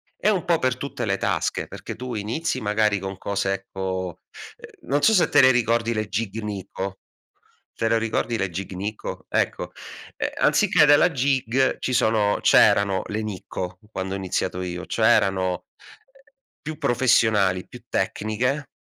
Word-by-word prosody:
è 210 - +1
un 190 -5 +1
po' 170 -2 +2
per 130 -1 +1
tutte 130 -4 -4
le 100 -1 0
tasche, - - -1
perché - - -8
tu 125 +1 -6
inizi 125 +7 -2
magari 105 -1 +1
con 95 0 -6
cose, 100 -1 -1
ecco, 95 -1 -5 0.3
uhm - - -15
non 145 +1 +2
so 220 - +5
se 180 - +4
te - - +6
le 130 - +7
ricordi 115 -1 +1
le 110 -1 -2
Gig 110 +2 -3
Nikko, 95 -2 -5 0.7
te 115 - -1
le 115 0 +3
ricordi 115 +1 -1
le 95 -3 -1
Gig 95 +3 -6
Nikko? 105 +3 -5
Ecco, - - -1 0.5
ehm, - - -1
anziché 150 - +4
della 145 +4 +5
Gig 130 -2 +1
ci 130 - -2
sono 110 -3 +2
c'erano 100 -1 +4
le 110 +1 -3
Nikko 90 -3 -6
quando 95 -1 -4
ho - - -2
iniziato 90 -1 -2
io, 90 0 -5
cioè - - +1
erano 95 -2 +2 1.0
più 155 -1 -5
professionali, 110 - +2
più - - -12
tecniche, 125 +7 -1
110 Hz, 160 wpm, -23 LUFS, 95-125 Hz, 1.0 s, le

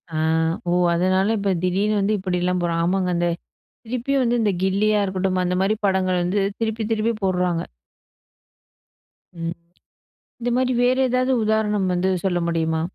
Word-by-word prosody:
ஆ. - - -1 0.5
ஓ! - - +2 0.2
அதனால 185 +4 +2
இப்ப 200 -1 0
திடீர்னு 200 +4 +1
வந்து 200 +2 +1
இப்படிலாம் 180 -1 -1
போடுறாங்க. 170 -1 0
ஆமாங்க 185 +1 0
அந்த 175 0 +1 0.6
திருப்பியும் 255 +4 -1
வந்து 240 0 +1
இந்த 210 -2 +2
கில்லியா 210 +2 +2
இருக்கட்டும், 190 -1 -1
அந்த 180 0 0
மாரி 205 +3 +2
படங்கள் 185 -2 +1
வந்து 185 +4 0 0.2
திருப்பி, 220 0 -2
திருப்பி 225 +1 +1
போடுறாங்க. 180 -2 0 1.8
ம். 165 +1 -3 0.9
இந்த 240 +1 -1
மாரி 255 0 +1
வேற 250 +1 +3
எதாவது 255 +1 +1
உதாரணம் 210 -2 +1
வந்து 180 +1 0 0.2
சொல்ல 180 -2 +1
முடியுமா? 160 -1 0
190 Hz, 145 wpm, -22 LUFS, 180-220 Hz, 1.8 s, வேற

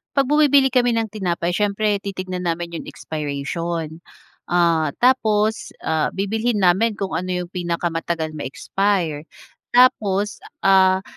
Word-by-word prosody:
'Pag 275 -1 +2
bumibili 285 -3 +5
kami 245 -2 +2
ng 225 -2 -1
tinapay, 175 -4 -2
siyempre 205 +2 0
titignan 185 -2 -5
namin 170 0 -2
yung - - -10
expiration. 160 +2 -4 0.5
Ah, 165 -4 +2
tapos, 220 -4 +2
ah, 160 -1 +1
bibilhin 220 +4 -1
namin 200 +5 +3
kung 195 -1 -4
ano 180 0 -2
yung 175 - -12
pinakamatagal 170 -2 -2
ma-expire. 160 +2 -2 0.5
Tapos, 210 -5 +3 0.2
ah, 190 -1 +4
185 Hz, 120 wpm, -21 LUFS, 170-215 Hz, 0.5 s, bumibili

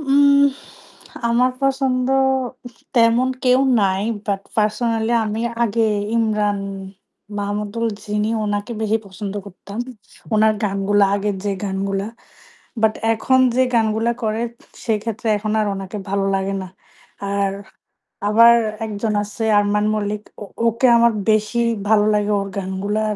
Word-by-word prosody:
উহ 280 0 +5 0.8
আমার 245 +2 +3
পছন্দ 265 -2 +1 0.6
উ - - -5 0.3
তেমন 235 +1 +4 0.2
কেউ 255 +1 +4 0.2
নাই। 190 -1 +1 0.2
বাট 200 -2 -1 0.2
পার্সোনালই 225 +1 +1
আমি 215 +1 -3 0.2
আগে 230 0 +1 0.3
'ইমরান 210 -3 +1 0.8
মাহমুদুল' 210 +3 -2
যিনি 210 0 -1 0.2
উনাকে 205 +3 -2
বেশি 220 0 +2
পছন্দ 195 +1 -6
করতাম। 200 +2 -10 0.6
উনার 215 0 +4
গানগুলা 200 0 +2
আগের 205 0 -1
যে 205 - 0
গানগুলা। 195 0 -2 0.8
বাট 220 -1 +3 0.2
এখন 260 +4 +2 0.2
যে 260 - +5
গানগুলা 225 0 +2
করে 220 0 -1 0.5
সেক্ষেত্রে 225 +1 -2
এখন 215 +1 -3
আর 215 - +1
ওনাকে 195 +1 -6
ভালো 200 0 0
লাগে 195 0 -1
না। 185 - -8 0.6
আর 200 0 0 0.8
আবার 230 +2 +7 0.3
একজন 215 +1 -2
আছে 210 +2 -5
'আরমান 205 0 +2
মল্লিক'। 210 0 -3 0.2
ও - - -5 0.2
ওকে 230 +3 +2
আমার 235 0 +4 0.2
বেশি 215 +2 +1 0.3
ভালো 210 -1 +4
লাগে 210 0 +1
ওর 195 - -4
গানগুলা। 195 +3 -2
210 Hz, 125 wpm, -20 LUFS, 200-230 Hz, 0.8 s, আবার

